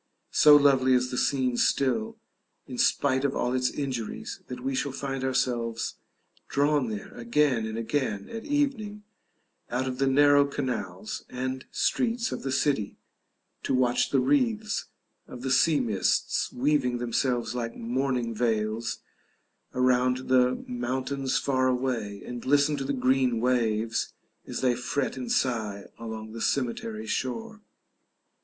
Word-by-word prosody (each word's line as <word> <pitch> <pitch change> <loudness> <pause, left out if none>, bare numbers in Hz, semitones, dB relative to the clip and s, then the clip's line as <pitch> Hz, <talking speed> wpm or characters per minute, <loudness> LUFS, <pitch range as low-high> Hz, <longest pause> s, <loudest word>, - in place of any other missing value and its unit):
So 150 -1 +7
lovely 135 -3 +5
is 125 0 +1
the - - -3
scene 130 -3 +1
still, 220 - +1 0.5
in 125 -2 -7
spite 130 -2 +2
of 140 -1 0
all 125 - 0
its 125 0 +1
injuries, 130 -6 -4
that 125 0 -7
we 135 +1 -1
shall 135 +1 -1
find 135 0 -4
ourselves 120 -3 -1 0.5
drawn 145 -2 +2
there 105 -2 -6
again 120 -1 +1
and 110 0 -5
again 115 -4 -2
at 225 0 -7
evening 270 -9 -1 0.7
out 130 +2 -1
of 130 0 -4
the 135 - +2
narrow 145 +1 +5
canals 140 - -4
and 130 +1 -4
streets 235 -1 0
of - - -4
the 135 - -3
city, 135 -6 0 0.6
to - - 0
watch 125 -1 +2
the 135 - +3
wreaths 220 - +1 0.4
of 125 0 -9
the 130 - -1
sea 155 +1 +4
mists 110 -7 0
weaving 130 -2 +1
themselves 120 0 -1
like 115 -2 -3
mourning 125 0 -1
veils 110 0 -1 0.7
around 125 0 +2
the 125 0 +3
mountains 130 +2 -2
far 130 -2 +1
away, 125 -6 -1
and 120 -1 -6
listen 145 +2 +3
to 135 - -3
the 135 - -2
green 130 -2 +2
waves 115 -2 0 0.3
as - - -4
they 125 -2 +3
fret 125 +3 -2
and 130 -2 -4
sigh 110 -5 0
along 110 -1 -6
the 115 0 -7
cemetery 115 -4 -1
shore. 220 - -3
130 Hz, 140 wpm, -27 LUFS, 120-140 Hz, 0.7 s, So